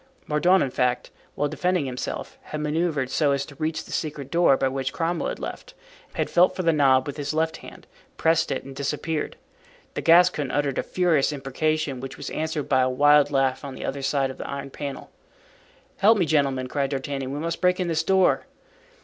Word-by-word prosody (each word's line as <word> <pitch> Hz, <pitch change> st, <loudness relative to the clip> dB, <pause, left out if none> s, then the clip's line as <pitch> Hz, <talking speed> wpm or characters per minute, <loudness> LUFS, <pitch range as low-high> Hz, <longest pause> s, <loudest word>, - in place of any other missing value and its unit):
Mordaunt, 175 Hz, +5 st, +3 dB
in 135 Hz, -, -2 dB
fact, 125 Hz, 0 st, 0 dB, 0.2 s
while 145 Hz, -, 0 dB
defending 155 Hz, +2 st, 0 dB
himself, 125 Hz, -1 st, -5 dB
had 155 Hz, -, -5 dB
manoeuvred 150 Hz, -3 st, -1 dB
so 145 Hz, -1 st, +2 dB
as 140 Hz, 0 st, -1 dB
to 145 Hz, -, -12 dB
reach 155 Hz, 0 st, -2 dB
the -, -, -13 dB
secret 145 Hz, -3 st, -4 dB
door 170 Hz, -5 st, +4 dB
by 135 Hz, -, +1 dB
which 135 Hz, 0 st, -2 dB
Cromwell 170 Hz, +1 st, -1 dB
had -, -, -4 dB
left, -, -, -7 dB, 0.4 s
had -, -, 0 dB
felt 180 Hz, +1 st, +3 dB
for 185 Hz, -, -2 dB
the 165 Hz, -1 st, +3 dB
knob 135 Hz, -3 st, +4 dB
with 145 Hz, 0 st, -6 dB
his 145 Hz, +1 st, -3 dB
left 160 Hz, 0 st, 0 dB
hand, -, -, -13 dB, 0.3 s
pressed 165 Hz, 0 st, +2 dB
it 135 Hz, -, -2 dB
and 135 Hz, 0 st, -10 dB
disappeared. 150 Hz, +3 st, -3 dB, 0.6 s
The -, -, -3 dB
Gascon 165 Hz, -4 st, +4 dB
uttered 145 Hz, -1 st, 0 dB
a -, -, +2 dB
furious 170 Hz, -6 st, +1 dB
imprecation, 145 Hz, 0 st, -1 dB
which 135 Hz, +1 st, -7 dB
was 145 Hz, -, -6 dB
answered 155 Hz, -2 st, -3 dB
by 130 Hz, -2 st, +3 dB
a 130 Hz, -, +2 dB
wild 145 Hz, +2 st, +5 dB
laugh 135 Hz, -1 st, +1 dB
on 140 Hz, -2 st, -6 dB
the -, -, -6 dB
other 140 Hz, +1 st, -3 dB
side 135 Hz, 0 st, 0 dB
of -, -, -13 dB
the -, -, -6 dB
iron 140 Hz, 0 st, -5 dB
panel. 140 Hz, -1 st, -7 dB, 0.9 s
"Help 215 Hz, +3 st, +5 dB
me, 180 Hz, -, +2 dB
gentlemen," 140 Hz, -4 st, +1 dB
cried 140 Hz, +1 st, -1 dB
D'Artagnan, 135 Hz, -1 st, -3 dB
"we 140 Hz, -, -4 dB
must 165 Hz, +2 st, -3 dB
break 180 Hz, 0 st, +3 dB
in 180 Hz, -, 0 dB
this 160 Hz, -1 st, +1 dB
door." 190 Hz, +2 st, +2 dB
145 Hz, 205 wpm, -24 LUFS, 135-160 Hz, 0.9 s, wild